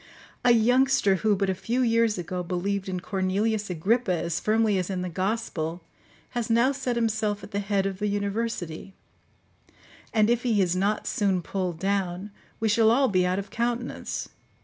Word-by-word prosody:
A - - +4
youngster 245 -3 +4
who, 210 +2 +2
but 195 0 0
a 190 - +1
few 240 +7 -1
years 230 -2 +2
ago, 180 +1 -3
believed 190 +2 -2
in 185 -1 -3
Cornelius 200 +3 -1
Agrippa 195 +6 +1
as 170 +1 -2
firmly 215 -1 +2
as 180 - -3
in 185 -2 -2
the 180 - -3
gospel, 180 -3 -2 0.5
has 240 -2 -3
now 235 +4 +4
set 260 -3 -2
himself 220 -3 0
at - - -10
the 200 - -1
head 200 -1 0
of 195 -1 -3
the 210 - 0
university; 200 -3 -3 1.2
and 215 -2 +3
if 240 +1 +2
he 230 -4 +1
is 180 -2 +2
not 200 +3 0
soon 190 -4 0
pulled 180 -2 -3
down, 195 +1 -2 0.3
we 225 - +1
shall 220 +1 +4
all 260 +4 +4
be 185 -2 +2
out 180 +1 0
of 200 0 -5
countenance. 240 +1 -3
200 Hz, 175 wpm, -26 LUFS, 185-225 Hz, 1.2 s, A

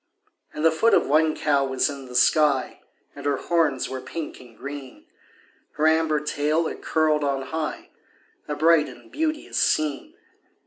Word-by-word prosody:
And 150 - -3
the 165 - +6
foot 225 +9 +3
of - - +3
one 155 +2 +2
cow 140 -2 +1
was 130 -1 +1
in 140 -3 -7
the 125 - -10
sky, 140 0 +2 0.3
And - - -5
her 140 -1 +1
horns 155 -6 0
were 130 -1 -6
pink 155 +4 -7
and 120 -3 -17
green; 140 -2 -9 0.7
Her 155 - 0
amber 160 -1 +3
tail 150 +2 0
it - - -5
curled 155 -2 +1
on 135 -1 -1
high 155 +3 -5 0.6
A 150 - -3
bright 160 0 +4
and - - -15
beauteous 310 0 -2
scene. 155 -8 0
150 Hz, 165 wpm, -24 LUFS, 140-160 Hz, 0.7 s, the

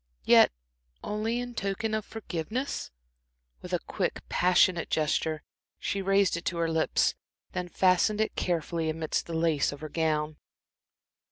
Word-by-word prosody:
"Yet - - +7 0.5
only 220 +3 -1
in 245 0 -5
token 215 +1 -2
of 215 0 0
forgiveness?" 220 - -4 0.7
With - - -9
a - - +2
quick, - - -2
passionate 180 -1 +3
gesture, 155 0 0 0.3
she 200 - -2
raised 195 -1 +3
it 170 - -5
to 175 - -1
her 165 -1 0
lips, 160 -1 +2 0.4
then 180 -1 -3
fastened 185 +4 +3
it 220 - 0
carefully 165 -2 -1
amidst 155 0 -2
the 165 - -4
lace 160 -3 +2
of 145 - -9
her 155 - -5
gown. 155 -1 0
175 Hz, 145 wpm, -28 LUFS, 160-200 Hz, 0.7 s, Yet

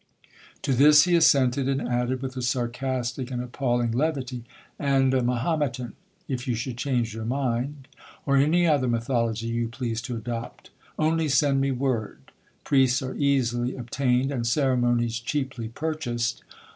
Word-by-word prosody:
To 135 - +1
this 150 +3 +7
he 180 -1 +3
assented; 135 -4 +4
and 135 0 +1
added, 125 +1 -1
with 130 0 -5
a 130 - -3
sarcastic 125 +1 -2
and 125 -2 -3
appalling 120 -1 -1
levity,—'And 135 0 -1
a 130 - +2
Mahometan, 125 0 -1 0.3
if 130 -3 -4
you 120 - 0
should 120 +2 -4
change 120 -3 -1
your 110 0 -5
mind,—or 135 +3 -3
any 155 +6 +4
other 145 -6 +2
mythology 115 -1 0
you 115 0 -1
please 115 -1 -4
to 120 0 -5
adopt;—only 135 +7 -3
send 140 0 +3
me 135 - +1
word,—priests 130 +1 -1
are 130 - -4
easily 125 -3 0
obtained, 125 +1 0
and 120 -4 -2
ceremonies 120 -3 +1
cheaply 130 -2 -3
purchased! 120 -3 -3
130 Hz, 135 wpm, -25 LUFS, 120-140 Hz, 0.3 s, this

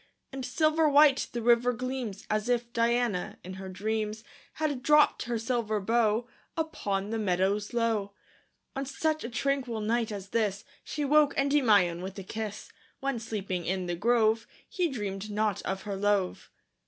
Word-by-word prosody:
And 270 -1 -5
silver 310 +5 +2
white 290 -1 +5
the 240 -1 -4
river 240 +1 +4
gleams, 250 -4 -4
As 215 +2 -1
if 240 -1 0
Diana, 235 -5 +1
in 185 - -7
her 190 - -6
dreams, 215 +3 -2 0.3
Had 295 -5 -2
dropt 300 +2 +4
her 235 0 -1
silver 225 -2 -1
bow 225 +2 +1 0.3
Upon 205 -11 -2
the 225 - -1
meadows 195 +1 0
low. 225 -4 0 0.6
On 270 - -2
such 310 +3 -1
a 235 - -4
tranquil 260 -2 -1
night 225 +1 0
as 200 -2 -6
this, 205 -3 -1 0.2
She 295 -1 -3
woke 295 0 +4
Endymion 220 -12 +3
with 190 +2 -6
a 195 - -5
kiss, 215 +1 -6 0.3
When, 275 -3 -1
sleeping 200 -5 -3
in 185 0 -1
the 175 0 -2
grove, 225 +2 +2 0.2
He 365 -6 0
dreamed 205 -5 -4
not 210 -1 0
of 190 0 -3
her 205 -2 -4
love. 200 -2 0
225 Hz, 160 wpm, -29 LUFS, 205-255 Hz, 0.6 s, white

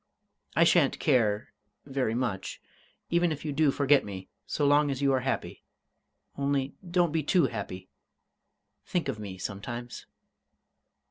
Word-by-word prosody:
I - - +6
shan't - - +4
care 110 -3 +1 0.3
very 135 -5 -1
much 120 -7 -2 0.5
even 170 0 +3
if 150 0 -5
you 150 - -2
do 155 0 +3
forget 140 0 +4
me, 95 -2 -8 0.2
so 145 - 0
long 145 +1 +4
as 135 -2 -2
you 135 -1 +4
are 130 - +3
happy.... 135 +1 -3 0.7
Only 140 -1 0 0.2
don't 175 -2 +2
be 160 0 +1
too 175 +4 +3
happy. 95 -2 -5 1.0
Think 175 -5 -1
of 125 - -3
me 100 -3 -6
sometimes!" 120 +6 -6
135 Hz, 140 wpm, -29 LUFS, 110-145 Hz, 1.0 s, I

